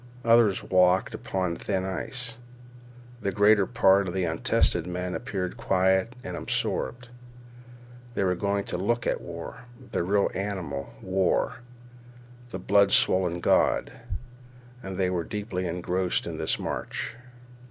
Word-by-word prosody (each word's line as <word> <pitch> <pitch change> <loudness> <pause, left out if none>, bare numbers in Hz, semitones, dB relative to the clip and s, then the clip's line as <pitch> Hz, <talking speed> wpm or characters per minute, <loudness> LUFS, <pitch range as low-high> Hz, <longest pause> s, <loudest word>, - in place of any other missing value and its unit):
Others 115 -4 +5
walked 90 0 +4
as - - -5
upon 90 -3 -1
thin 95 -2 -2
ice. 115 +5 -4 0.8
The 100 - 0
greater 105 0 +4
part 100 -4 +4
of 90 - -4
the 95 - +1
untested 85 0 +1
men 90 0 -3
appeared 100 -2 -3
quiet 95 -1 +2
and - - -5
absorbed. 120 +1 -2 1.1
They - - +1
were 90 -1 +2
going 100 +2 -1
to 90 - -4
look 120 +5 0
at - - 0
war, 85 +8 -8 0.3
the - - 0
red 100 +3 +1
animal—war, 95 - -1 0.9
the 105 - -5
blood 100 +2 +4
swollen 90 -2 +3
god. - - +3 0.9
And 95 -5 -6
they 90 -1 +1
were 90 -2 -1
deeply 100 -2 -3
engrossed 90 +1 -1
in - - -5
this - - +1
march. - - -4
95 Hz, 130 wpm, -27 LUFS, 90-105 Hz, 1.1 s, Others